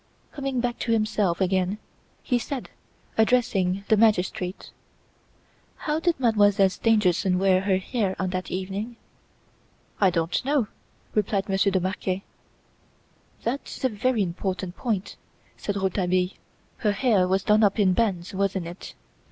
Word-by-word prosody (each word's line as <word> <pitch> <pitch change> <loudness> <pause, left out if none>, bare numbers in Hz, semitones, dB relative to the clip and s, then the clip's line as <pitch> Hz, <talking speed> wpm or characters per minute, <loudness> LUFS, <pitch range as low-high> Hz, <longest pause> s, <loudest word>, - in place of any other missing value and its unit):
Coming 275 -3 -2
back 240 0 -2
to 235 - -1
himself 215 -5 +1
again 190 +1 +1 0.5
he 245 -2 +1
said, 260 +3 -5 0.5
addressing 200 -5 +2
the 220 - +5
magistrate: 190 -4 +1 1.1
"How 305 0 +1
did 335 -3 0
Mademoiselle 205 -5 +4
Stangerson 190 -4 +2
wear 185 0 +3
her 190 -1 +2
hair 190 0 -1
on 185 -1 -2
that 185 0 -3
evening?" 195 +5 -4 1.0
"I 195 - +5
don't 165 +3 -1
know," 270 -5 +1 0.4
replied 205 -1 0
Monsieur 195 0 +2
de 190 - +2
Marquet. 185 +1 -2 1.2
"That's 265 +4 -4
a 260 - +3
very 225 0 +1
important 185 0 -3
point," 210 -6 -3 0.4
said 205 - -4
Rouletabille. 185 -1 +1 0.5
"Her 210 -2 +1
hair 205 -4 +3
was 190 +1 +1
done 210 0 +4
up 200 +1 +3
in 190 -3 +4
bands, 185 -4 0
wasn't 195 -2 -1
it? 175 +2 -9
200 Hz, 135 wpm, -25 LUFS, 185-225 Hz, 1.2 s, the